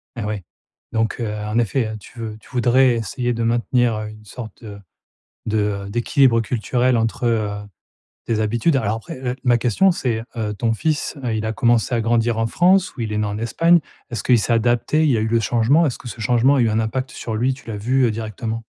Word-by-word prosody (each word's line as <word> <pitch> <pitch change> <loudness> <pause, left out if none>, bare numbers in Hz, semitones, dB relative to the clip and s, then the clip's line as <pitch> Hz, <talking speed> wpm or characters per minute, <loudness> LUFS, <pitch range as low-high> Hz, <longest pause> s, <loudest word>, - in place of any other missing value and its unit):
Ah 115 -4 -4
ouais, 105 -2 -3 0.5
donc, 110 +1 -1
heu, 110 -2 -2
en 105 +1 -3
effet, 115 -1 0
tu 110 +4 -14
veux 110 -1 -5
tu - - -20
voudrais 125 0 +3
essayer 120 +2 -2
de 115 0 -2
maintenir, 120 0 +1
heu, 110 0 -4
une 110 0 -13
sorte 110 -1 -9
de 105 -2 -8 0.7
de, 110 0 0 0.3
heu, - - -8
d'équilibre 120 +2 +3
culturel 125 +2 0
entre, 115 +2 -1
heu, 110 -3 +1 0.8
tes 115 -2 0
habitudes. 120 +9 +1
Alors 110 -5 0
après, 165 +7 -9
heu, 125 -1 -3
ma 120 -2 +4
question, 125 - +3
c'est, 120 -9 -2
heu, 105 -2 -2
ton 110 +3 0
fils, 155 +8 -1
heu, 120 -3 -1
il 110 0 -2
a 110 - -2
commencé 120 +2 +2
à 115 - +1
grandir 115 0 +1
en 115 - +1
France? 180 - +3
Ou 130 - -5
il 110 -2 -3
est - - -1
né 105 - 0
en 105 +1 -3
Espagne? 165 +10 +3 0.3
Est-ce 115 -3 -4
qu'il 125 -2 +4
s'est 115 - 0
adapté? 120 +6 +2
Il 155 - +3
y 125 - +3
a - - 0
eu - - 0
le 115 +1 +2
changement, 120 +8 +3
est-ce 125 - -3
que - - -11
ce 115 -1 -7
changement 125 +4 +3
a 135 - +3
eu 115 - +3
un 110 +1 +1
impact 130 +4 -2
sur 115 - -6
lui, 125 +4 +1
tu 135 - -17
l'as 110 -2 -4
vu, 130 +6 +1
heu, 115 - +2
directement? 110 +1 -4
115 Hz, 235 wpm, -21 LUFS, 110-125 Hz, 0.8 s, ma